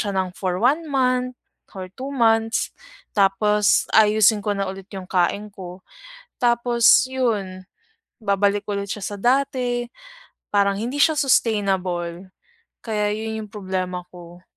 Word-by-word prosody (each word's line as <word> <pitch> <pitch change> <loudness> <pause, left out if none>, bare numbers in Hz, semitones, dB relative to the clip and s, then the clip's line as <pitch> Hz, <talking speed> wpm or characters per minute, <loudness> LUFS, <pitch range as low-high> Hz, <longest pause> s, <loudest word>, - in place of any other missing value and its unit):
siya 200 -2 -2
nang 185 -1 0
for 185 -2 -2
1 285 +8 +2
month 255 -1 +1 0.4
or 185 -1 -7
2 265 +6 -7
months, 225 -2 +2 0.5
tapos 205 +1 +3
aayusin 215 0 +5
ko 205 - 0
na 195 - -1
ulit 190 0 -10
yung 190 -1 -7
kain 200 +3 0
ko. 185 -2 -10 0.6
Tapos 240 -1 +4
yun, 205 -8 -2 0.6
babalik 200 0 +1
ulit 200 0 -3
siya 210 - -5
sa 205 - -5
dati, 245 0 0 0.7
parang 200 -1 +2
hindi 245 +6 -3
siya 315 +1 +4
sustainable, 190 - 0 0.6
kaya 210 -2 -1
yun 220 0 -4
yung 210 - -17
problema 185 -3 -3
ko. 175 0 -13
210 Hz, 130 wpm, -22 LUFS, 190-235 Hz, 0.7 s, aayusin